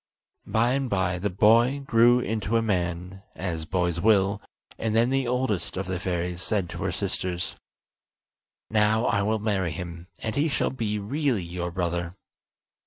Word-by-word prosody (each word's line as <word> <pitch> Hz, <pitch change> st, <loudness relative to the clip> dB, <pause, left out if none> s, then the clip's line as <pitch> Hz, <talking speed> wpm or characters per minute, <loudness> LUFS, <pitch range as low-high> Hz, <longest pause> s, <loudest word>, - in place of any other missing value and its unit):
By 115 Hz, +2 st, +2 dB
and 135 Hz, -1 st, -1 dB
by 95 Hz, -3 st, 0 dB
the 100 Hz, +3 st, -1 dB
boy 115 Hz, +8 st, +4 dB
grew 120 Hz, 0 st, +5 dB
into 115 Hz, -1 st, -1 dB
a -, -, +2 dB
man, 90 Hz, -2 st, -2 dB
as 85 Hz, -4 st, -3 dB
boys 85 Hz, -1 st, 0 dB
will, 100 Hz, -1 st, +3 dB, 0.4 s
and 110 Hz, -1 st, -1 dB
then 120 Hz, +3 st, +3 dB
the 135 Hz, -2 st, +1 dB
oldest 120 Hz, -10 st, -1 dB
of 95 Hz, -, -2 dB
the 90 Hz, -1 st, -3 dB
fairies 90 Hz, -1 st, -2 dB
said 95 Hz, -4 st, -1 dB
to 85 Hz, -, -7 dB
her 95 Hz, 0 st, -1 dB
sisters: 90 Hz, -3 st, -2 dB, 1.2 s
"Now 110 Hz, +1 st, +3 dB
I 100 Hz, -, +2 dB
will 110 Hz, +2 st, +1 dB
marry 100 Hz, -4 st, 0 dB
him, 85 Hz, 0 st, -7 dB
and 110 Hz, -, -4 dB
he 150 Hz, +3 st, +2 dB
shall -, -, 0 dB
be 110 Hz, -5 st, -2 dB
really 120 Hz, -, 0 dB
your 85 Hz, +1 st, -4 dB
brother." 85 Hz, 0 st, -2 dB
100 Hz, 165 wpm, -26 LUFS, 90-115 Hz, 1.2 s, grew